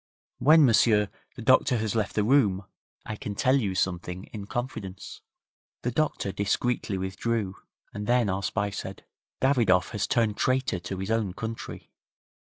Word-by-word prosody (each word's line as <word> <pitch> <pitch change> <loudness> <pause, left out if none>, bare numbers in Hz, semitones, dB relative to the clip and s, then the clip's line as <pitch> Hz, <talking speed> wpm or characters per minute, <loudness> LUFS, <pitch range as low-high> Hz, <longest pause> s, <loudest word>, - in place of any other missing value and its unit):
'When, 155 +1 +7
m'sieur, 105 -3 +4 0.3
the 120 - -8
doctor 130 0 +4
has 110 -2 -1
left 110 -2 -1
the 105 - +2
room 105 -6 +3 0.4
I 105 - -4
can 105 0 -6
tell 130 +6 +3
you 100 -8 -1
something 90 0 -2
in 100 -2 -6
confidence.' 115 -7 -5 0.6
The 125 - 0
doctor 145 -7 -1
discreetly 105 +1 -1
withdrew, 95 +2 -2 0.4
and 105 0 -5
then 120 -2 +3
our 95 0 -1
spy 100 +1 -1
said: 95 -1 -7 0.4
'Davidoff 115 -9 +3
has 105 - -1
turned 110 -3 +1
traitor 130 -7 +1
to 90 +2 -6
his 95 +3 -3
own 110 -5 0
country. 115 0 -6
105 Hz, 155 wpm, -27 LUFS, 95-120 Hz, 0.6 s, When